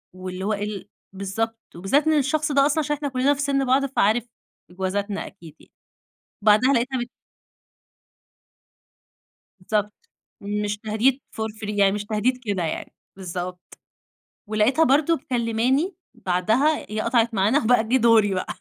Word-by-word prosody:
واللي 185 0 -6
هو 215 - 0
إيه 205 0 -3
ال 210 -2 -6 0.3
بالضبط. 225 +4 -3 0.2
وبالذات 270 - +1
إن 310 -1 +4
الشخص 300 +2 0
ده 275 0 +4
أصلًا 300 +2 +1
عشان 295 0 0
إحنا 285 -1 -4
كُلّنا 260 +2 +2
في 285 - -4
سِن 275 -1 +1
بعض 265 +2 +3
فعارف 240 -3 +1 0.5
إجوازاتنا 200 +2 -3
أكيد 165 -5 -14
يعني. - - -21 0.7
بعدها 220 +6 +5
لقيتها 255 +2 0
بت 240 +1 -4 2.6
بالضبط. 210 - -2 0.3
مش 205 0 -2
تهديد 225 +5 +1 0.2
for 220 0 -2
free، 210 - -5
يعني 195 -1 +4
مش 205 0 -3
تهديد 220 +4 0
كده 200 -4 -1
يعني. 160 - -4 0.2
بالضبط. 180 -1 -7 0.7
ولقيتها 215 +9 +2
برضه 295 +5 +3
مكلِّماني، 255 - 0 0.2
بعدها 220 - +1
هي 215 0 -2
قطعت 235 -1 +1
معانا، 210 +8 +3
وبقى 230 0 +4
جِه 260 - +3
دوري 225 -5 +4
بقى. 185 - -3
225 Hz, 145 wpm, -23 LUFS, 205-270 Hz, 2.6 s, بعدها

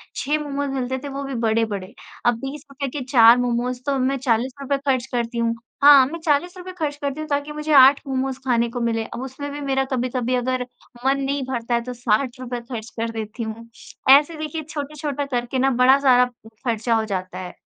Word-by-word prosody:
6 295 +3 0
मोमोज़ 285 -1 -3
मिलते 260 -1 -2
थे - - -5
वो 275 +1 -5
भी 270 -2 -5
बड़े-बड़े। 220 -4 -1 0.3
अब 240 -1 +4
20 290 +2 -7
रुपये 275 -1 -4
के 260 - -4
4 235 -2 +8
मोमोज़ 245 +1 -1
तो 280 -1 0
मैं 265 +2 +1
40 250 0 0
रुपये 275 0 0
खर्च 255 -3 +2
करती 235 -1 -2
हूँ। 230 0 +1 0.3
हाँ, 285 -2 +9
मैं 335 +4 -6
40 325 +4 +1
रुपये 365 0 -8
खर्च 305 -5 -3
करती 285 0 -4
हूँ 310 - -5
ताकि 285 +1 -1
मुझे 300 +1 -4
8 270 +1 +8
मोमोज़ 265 0 -2
खाने 235 -2 +2
को 245 -1 -4
मिलें। 225 -1 0
अब 245 - -7
उसमें 285 +2 -6
भी 290 - -6
मेरा 270 -1 0
कभी-कभी 250 0 -1
अगर 250 0 -1 0.4
मन 275 +1 +3
नहीं 275 0 -1
भरता 240 -2 -2
है 235 - +1
तो 250 - -5
60 245 +2 0
रुपये 245 -1 -5
खर्च 225 -1 -5
कर 230 0 -1
देती 225 +1 -5
हूँ। 225 +1 -7 0.4
ऐसे 295 +4 +6
देखिए 310 +1 -4
छोटे-छोटे 290 -1 -4
करके 240 +2 -2
ना 270 - +3
बड़ा 265 +2 +6
सारा 250 -3 +5 0.4
खर्चा 230 0 +1
हो 220 - +1
जाता 185 -3 -4
है। 180 -1 -7
260 Hz, 210 wpm, -22 LUFS, 235-280 Hz, 0.4 s, हाँ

